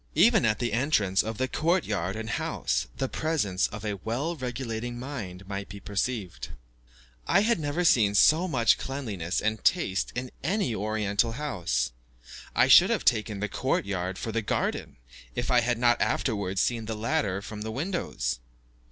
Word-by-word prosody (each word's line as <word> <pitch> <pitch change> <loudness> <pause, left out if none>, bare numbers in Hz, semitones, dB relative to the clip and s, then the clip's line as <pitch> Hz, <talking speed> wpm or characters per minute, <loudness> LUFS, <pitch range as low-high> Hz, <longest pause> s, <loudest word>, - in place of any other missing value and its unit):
Even 225 - +5
at 105 -1 +2
the 120 -3 -2
entrance 110 - +2
of 110 0 -5
the 130 - 0
court 165 +5 +1
yard 95 -2 -2
and 110 0 -5
house, - - -1
the 135 - -1
presence 130 - 0
of 105 +1 -8
a 105 -1 -2
well 135 +10 -2
regulating 120 -3 -4
mind 105 -8 -7
might 100 0 -5
be 100 +1 -8
perceived. 100 -1 -3 0.8
I 195 - +4
had 230 -2 +2
never 155 +4 -1
seen 105 -9 +4
so 160 - +5
much 120 -9 +3
cleanliness 105 -11 -3
and 110 0 -1
taste 100 - +1
in 125 0 -4
any 190 - 0
Oriental 105 +1 0
house. 85 - -1 0.6
I - - +5
should - - +8
have - - 0
taken 105 -2 +1
the 105 - 0
court 130 +4 -1
yard 95 -1 -3
for 115 - -4
the 115 +1 0
garden, 105 - -2 0.4
if 120 +2 -1
I 125 - +6
had 120 0 0
not 120 0 +3
afterwards 100 -6 0
seen 115 -2 0
the 110 - -3
latter 105 -3 0
from 105 +1 -8
the 110 - -4
windows. 120 - -2
110 Hz, 170 wpm, -27 LUFS, 100-130 Hz, 0.8 s, should